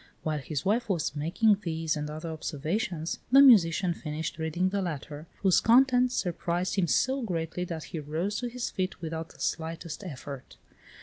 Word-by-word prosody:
While 155 Hz, -1 st, -1 dB
his 145 Hz, 0 st, -4 dB
wife 225 Hz, +4 st, +1 dB
was 165 Hz, -6 st, -1 dB
making 195 Hz, +8 st, +2 dB
these 160 Hz, -3 st, -1 dB
and 150 Hz, 0 st, -3 dB
other 155 Hz, +2 st, -6 dB
observations, 160 Hz, +2 st, -3 dB
the 270 Hz, -, +8 dB
musician 185 Hz, -9 st, +6 dB
finished 155 Hz, 0 st, -5 dB
reading 160 Hz, +4 st, 0 dB
the 200 Hz, +1 st, -1 dB
letter, 155 Hz, -2 st, -5 dB, 0.2 s
whose 190 Hz, -2 st, +5 dB
contents 250 Hz, +1 st, +4 dB
surprised 175 Hz, 0 st, -1 dB
him 190 Hz, -4 st, +1 dB
so 265 Hz, -, +2 dB
greatly 180 Hz, -4 st, -3 dB
that 165 Hz, -3 st, -5 dB
he 165 Hz, -, -6 dB
rose 160 Hz, +7 st, -2 dB
to 245 Hz, -, -3 dB
his 245 Hz, 0 st, -4 dB
feet 185 Hz, 0 st, -3 dB
without 160 Hz, -1 st, -5 dB
the -, -, -18 dB
slightest 165 Hz, +2 st, -3 dB
effort. 140 Hz, -5 st, -8 dB
170 Hz, 170 wpm, -28 LUFS, 155-200 Hz, 0.2 s, the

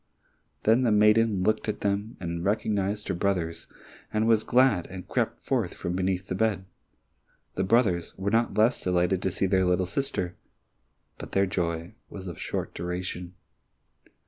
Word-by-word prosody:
Then 115 Hz, +4 st, +4 dB
the 120 Hz, -3 st, +2 dB
maiden 105 Hz, -1 st, +4 dB
looked 110 Hz, +2 st, +1 dB
at 105 Hz, -, -3 dB
them 100 Hz, +2 st, -1 dB
and 85 Hz, -1 st, -4 dB
recognized 105 Hz, 0 st, 0 dB
her -, -, 0 dB
brothers, 85 Hz, -3 st, -1 dB, 0.4 s
was 110 Hz, 0 st, +3 dB
glad 125 Hz, -8 st, +3 dB
and 90 Hz, 0 st, -9 dB
crept -, -, -2 dB
forth -, -, 0 dB
from 85 Hz, -, -3 dB
beneath 95 Hz, 0 st, -1 dB
the 95 Hz, -, -4 dB
bed. 100 Hz, -2 st, 0 dB, 0.9 s
The 95 Hz, -, -1 dB
brothers 95 Hz, -4 st, +2 dB
were 95 Hz, +1 st, -1 dB
not 115 Hz, 0 st, +1 dB
less 110 Hz, +3 st, +3 dB
delighted 90 Hz, 0 st, +1 dB
to -, -, 0 dB
see 95 Hz, -, 0 dB
their 95 Hz, 0 st, +3 dB
little 90 Hz, +1 st, +2 dB
sister, 95 Hz, -4 st, -2 dB, 0.8 s
but -, -, -9 dB
their 100 Hz, 0 st, +3 dB
joy 85 Hz, -2 st, -2 dB, 0.2 s
was 95 Hz, -2 st, -8 dB
of 85 Hz, -4 st, -7 dB
short -, -, -3 dB
duration. 90 Hz, +1 st, -5 dB
95 Hz, 155 wpm, -27 LUFS, 90-105 Hz, 0.9 s, Then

